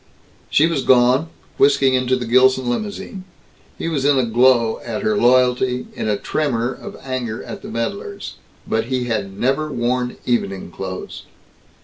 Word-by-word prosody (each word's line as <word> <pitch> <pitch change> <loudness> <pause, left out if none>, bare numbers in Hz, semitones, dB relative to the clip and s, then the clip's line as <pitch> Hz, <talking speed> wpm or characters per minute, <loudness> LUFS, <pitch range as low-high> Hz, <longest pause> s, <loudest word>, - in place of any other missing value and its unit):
She 150 - +4
was 165 -4 0
gone, 130 +5 +4 0.3
whisking 140 -1 +4
into 130 0 +2
the 125 -1 -3
Gilson 130 +2 +4
limousine. 200 - -4 0.5
He - - -4
was 150 -5 -1
in 145 0 +4
a 130 - +2
glow 120 -1 +3
at - - -4
her 215 0 +1
loyalty, 125 -3 +3
in - - -3
a 105 - +1
tremor 125 -2 -1
of - - -10
anger 125 -4 -4
at - - -8
the - - -9
meddlers. 200 - -5 0.3
But 110 0 0
he 130 0 -1
had 100 -5 -3
never 140 +4 0
worn 125 0 -1
evening 100 -7 -1
clothes. 95 +1 -7
125 Hz, 155 wpm, -20 LUFS, 120-135 Hz, 0.5 s, She